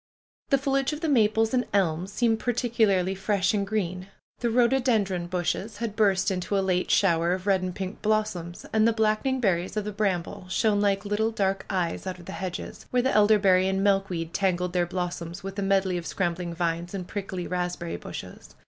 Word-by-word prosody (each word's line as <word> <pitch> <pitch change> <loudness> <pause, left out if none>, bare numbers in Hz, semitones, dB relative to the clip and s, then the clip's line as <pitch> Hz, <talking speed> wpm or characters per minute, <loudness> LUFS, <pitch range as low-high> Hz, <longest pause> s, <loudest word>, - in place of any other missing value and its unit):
The 275 - +5
foliage 275 +1 0
of 300 - -6
the 325 - -1
maples 225 -4 +3
and 250 -1 +3
elms 180 -1 +1
seemed 225 +1 +1
particularly 220 -7 +1
fresh 195 +1 0
and 200 -2 0
green. 185 -3 -2 0.3
The 240 - 0
rhododendron 230 -7 +2
bushes 185 +4 -2
had 225 -2 -4
burst 195 -2 +2
into 185 +2 -1
a - - +2
late 180 -1 0
shower 170 -2 +3
of 185 0 -4
red 195 -2 +3
and 185 -1 -4
pink 190 0 -5
blossoms. 210 -6 -1
And 220 0 +4
the 230 - +3
blackening 220 +4 +1
berries 190 -3 0
of 210 - 0
the 210 - -3
bramble 185 -3 -2
shone 205 +1 +2
like 200 0 +1
little 210 +2 +1
dark 195 -3 -1
eyes 180 -1 -2
out 185 - -4
of 175 - -13
the - - -7
hedges, 185 -3 -6
where 250 -1 +1
the 265 - +2
elderberry 200 -3 +5
and 190 0 0
milk 195 -1 +2
weed 165 -2 -4
tangled 180 -2 0
their 175 -1 +1
blossoms 175 0 -4
with 195 +1 -5
a - - 0
medley 195 -2 +1
of 165 - -7
scram 175 -3 0
bling 170 -1 -6
vines 170 +2 -2
and 180 -2 -5
prickly 190 -3 -4
raspberry 175 -1 -3
bushes. - - -9
195 Hz, 200 wpm, -26 LUFS, 180-215 Hz, 0.3 s, The